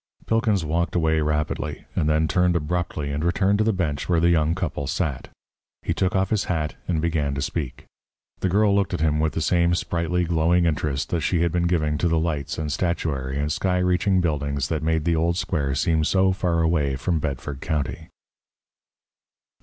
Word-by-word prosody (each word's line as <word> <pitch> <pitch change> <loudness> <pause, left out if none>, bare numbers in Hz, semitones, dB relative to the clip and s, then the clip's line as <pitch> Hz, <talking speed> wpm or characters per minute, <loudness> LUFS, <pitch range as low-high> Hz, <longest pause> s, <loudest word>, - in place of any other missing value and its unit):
Pilkins 110 -6 +1
walked 85 +4 -1
away 80 -2 +2
rapidly, 75 0 -2
and 75 - +1
then 80 +1 +2
turned 90 0 +2
abruptly 75 -2 -2
and 75 +2 -2
returned 95 +4 +2
to - - +4
the 110 - +2
bench 85 -7 -2
where 85 -2 +3
the 85 +1 +4
young 80 0 +2
couple 75 -6 -3
sat. 70 -2 -2 0.6
He - - 0
took 95 0 0
off 95 0 +1
his 110 -3 +1
hat 80 -4 -1
and 85 -3 0
began 75 -4 0
to 70 - -2
speak. 70 -3 -4 0.5
The 95 - 0
girl 100 +2 +3
looked 100 -2 +1
at - - -4
him 75 -1 +2
with 80 0 +1
the 80 - -2
same 85 +1 +2
sprightly, 85 +1 -1
glowing 85 +1 +2
interest 75 -3 -1
that 85 - -1
she 85 0 +1
had 85 -1 +2
been 85 0 +1
giving 75 -4 0
to 85 - +2
the 85 -1 +2
lights 80 -1 -2
and 75 -1 -3
statuary 75 -6 -2
and 75 +1 -1
sky 90 +2 0
reaching 90 +1 +2
buildings 70 -4 -1
that 80 -1 -1
made 80 0 0
the 85 -1 +2
old 85 +2 +1
square 75 -7 -1
seem 80 +1 +1
so 95 +3 +3
far 90 -3 0
away 75 -5 +1
from 80 +4 -1
Bedford 70 -1 -4
County. 80 +1 -3
80 Hz, 195 wpm, -24 LUFS, 75-90 Hz, 0.6 s, to